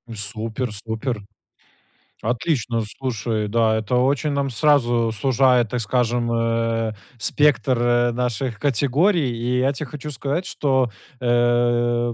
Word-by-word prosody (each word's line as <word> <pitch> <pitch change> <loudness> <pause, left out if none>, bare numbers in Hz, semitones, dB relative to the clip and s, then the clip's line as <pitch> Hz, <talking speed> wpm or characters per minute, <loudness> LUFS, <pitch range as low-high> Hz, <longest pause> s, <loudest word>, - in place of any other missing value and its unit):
Супер 110 +3 -2
супер. 110 +2 -3 1.0
Отлично, 120 0 -1 0.2
слушай, 115 -4 -2
да. 110 +1 +2
Это 110 +3 -1
очень 135 +4 +1
нам 140 -1 -1
сразу 120 -3 +2
сужает, 125 +1 +2
так 125 - -2
скажем, 120 +1 0
э, 115 -1 0 0.3
спектр, 135 +2 +2
э, 120 0 +2
наших 125 0 -2
категорий. 145 - +2
И 120 +2 -1
я 130 +2 +2
те 145 +2 -5
хочу 145 +3 -7
сказать, 145 +6 -3
что, 130 -3 +1 0.3
э, 120 0 +2
120 Hz, 120 wpm, -22 LUFS, 115-135 Hz, 1.0 s, да